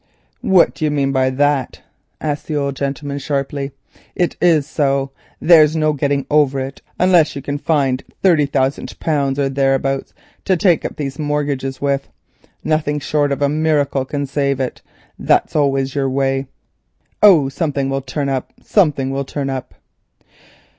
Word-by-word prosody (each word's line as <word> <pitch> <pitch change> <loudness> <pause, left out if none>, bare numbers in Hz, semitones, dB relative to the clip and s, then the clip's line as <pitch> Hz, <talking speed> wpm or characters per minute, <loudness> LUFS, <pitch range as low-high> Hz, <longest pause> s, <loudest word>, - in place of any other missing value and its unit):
"What 190 -7 +4
do - - -7
you 155 - +2
mean 140 -2 0
by 130 -1 +2
that?" 140 -1 0 0.4
asked 150 -2 -3
the 155 - -2
old 140 -1 -1
gentleman 140 +1 -3
sharply. 140 0 -3 0.4
"It 175 - 0
is 165 -5 +4
so, 140 -3 0 0.3
there's 155 -2 +6
no 155 -1 +2
getting 140 -1 -1
over 145 -2 +2
it 135 +1 -6 0.2
unless 175 -5 +4
you 140 - -5
can 145 +1 -3
find 140 -5 0 0.2
thirty 165 -7 +4
thousand 135 0 -1
pounds 140 -4 0
or 140 -1 +1
thereabouts, 135 0 0 0.3
to 185 - +2
take 175 -2 +3
up - - -4
these 140 0 -5
mortgages 145 -3 -2
with. 140 -1 -1 0.5
Nothing 150 -1 0
short 145 0 0
of 140 +1 -1
a - - +4
miracle 150 -3 +1
can 140 +2 -3
save 140 -1 -1
it. 130 -2 -3 0.4
That's - - +1
always 135 -2 +1
your 135 -2 0
way. 135 0 0 0.7
'Oh, 175 -10 +7
something 140 -1 -2
will 135 0 -1
turn 140 +2 -3
up, 135 -2 -3
something 145 -9 +1
will 135 +1 -2
turn 135 0 -4
up. 130 -2 -6
140 Hz, 160 wpm, -18 LUFS, 135-150 Hz, 0.7 s, Oh